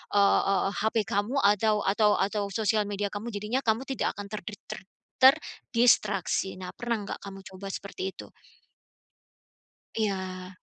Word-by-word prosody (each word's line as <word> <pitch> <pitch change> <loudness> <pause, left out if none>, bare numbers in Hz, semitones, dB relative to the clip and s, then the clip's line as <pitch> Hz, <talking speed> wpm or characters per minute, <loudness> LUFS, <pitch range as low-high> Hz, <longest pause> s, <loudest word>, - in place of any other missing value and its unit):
eee 200 -1 +5
eee, 195 -1 +2
HP 220 +1 +1
kamu 210 +4 -1
atau 210 +1 +3
atau 210 +1 +3
atau 205 0 0
sosial 215 -1 +1
media 205 0 -2
kamu. 210 +3 -5
Jadinya 210 +5 -1
kamu 230 -1 0
tidak 270 -1 -2
akan 205 0 -8
terdik 210 -1 -7
ter - - -7 0.4
terdistraksi, 235 - +3
nah 185 -1 -7
pernah 235 -3 -3
nggak 200 - -5
kamu 195 -1 -9
coba 190 +1 -9
seperti 195 -1 -5
itu? - - -10 1.7
Iya. 185 -3 -3
205 Hz, 140 wpm, -28 LUFS, 195-220 Hz, 1.7 s, eee